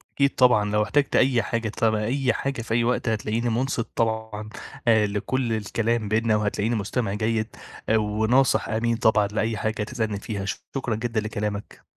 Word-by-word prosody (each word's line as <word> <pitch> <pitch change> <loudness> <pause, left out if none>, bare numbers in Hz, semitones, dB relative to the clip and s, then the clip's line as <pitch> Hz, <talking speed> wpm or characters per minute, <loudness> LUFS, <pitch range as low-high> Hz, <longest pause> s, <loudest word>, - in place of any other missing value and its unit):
أكيد 140 0 +2
طبعًا، 115 -5 +4
لو 105 0 +2
احتجت 140 +7 +1
أي 125 -3 +4
حاجة 115 0 -2
تبع 110 0 +1
أي 130 +3 +1
حاجة 140 -3 -3
في 115 - -4
أي 120 0 +3
وقت، 120 -1 0
هتلاقيني 110 +2 -1
منصت 120 0 -1
طبعًا 110 -2 -2 0.4
آآ 110 -2 +5
لكل 115 +4 -1
الكلام 110 0 -1
بينّا، 110 0 +2
وهتلاقيني 105 +2 0
مستمع 105 0 -1
جيد 110 +1 -1 0.3
وناصح 110 +4 +2
أمين 115 +1 0
طبعًا 110 -3 +3
لأي 110 +2 -1
حاجة 110 0 -1
تسألني 110 -3 -3
فيها. 105 -3 -4 0.3
شكرًا 125 -4 -1
جدًا 115 0 -1
لكلامك. 105 -1 -5
110 Hz, 160 wpm, -24 LUFS, 105-120 Hz, 0.4 s, آآ